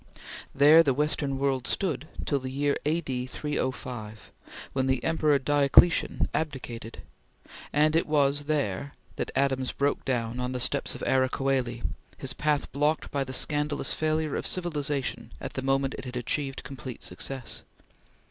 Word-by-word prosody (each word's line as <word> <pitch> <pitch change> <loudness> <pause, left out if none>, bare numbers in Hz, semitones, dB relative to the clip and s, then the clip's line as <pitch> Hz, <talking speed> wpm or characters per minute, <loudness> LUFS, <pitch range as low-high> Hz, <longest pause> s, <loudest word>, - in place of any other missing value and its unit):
There 150 +4 +8
the 140 -5 +2
Western 145 -1 0
world 135 -2 0
stood 155 -7 -1 0.2
till 140 - +1
the 130 0 -5
year 140 +2 +1
A.D. 135 -6 -1
305, 125 -6 -4 0.4
when 130 -1 +1
the 130 -2 +1
Emperor 155 -3 +3
Diocletian 145 +4 +4
abdicated; 125 -7 -4 0.7
and 155 +1 +3
there 165 - +5
it - - -4
was 145 -1 +2
that 140 -3 -3
Adams 135 -1 +1
broke 140 +1 0
down 120 -2 -1
on 125 +1 -2
the 125 - -2
steps 130 +3 0
of - - -7
Ara 130 -1 +3
Coeli, 130 -3 -1 0.3
his 130 -1 -3
path 150 0 0
blocked 150 +2 0
by 140 -1 0
the 130 - -7
scandalous 145 +2 0
failure 155 -1 0
of - - -1
civilization 150 -6 -2
at - - -6
the - - -3
moment 135 0 +1
it - - -7
had 125 0 -5
achieved 135 +3 -2
complete 130 -2 -7
success. 135 -3 -4
140 Hz, 150 wpm, -28 LUFS, 130-150 Hz, 0.7 s, There